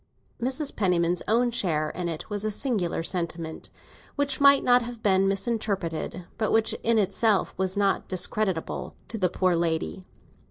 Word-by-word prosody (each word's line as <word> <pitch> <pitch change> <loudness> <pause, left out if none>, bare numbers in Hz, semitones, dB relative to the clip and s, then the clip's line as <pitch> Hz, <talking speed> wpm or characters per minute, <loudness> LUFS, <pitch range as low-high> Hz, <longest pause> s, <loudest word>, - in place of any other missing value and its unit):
Mrs. 265 +4 -1
Penniman's 175 -3 +1
own 240 +3 +3
share 160 -10 0
in 175 -1 -3
it 160 -2 -5
was 205 -1 -3
a 215 - 0
singular 205 -8 -1
sentiment, 165 -2 -4 0.5
which 285 -1 0
might 280 0 +6
have 245 -2 +2
been 195 -1 +4
misinterpreted, 195 -5 -2
but 215 - +1
which 225 0 +2
in 230 0 +2
itself 205 +1 +2
was 190 +1 -1
not 200 -1 +1
discreditable 185 -1 -2
to 225 - -4
the 185 -2 +2
poor 185 0 +1
lady. 165 +2 -1
195 Hz, 150 wpm, -26 LUFS, 175-230 Hz, 0.5 s, might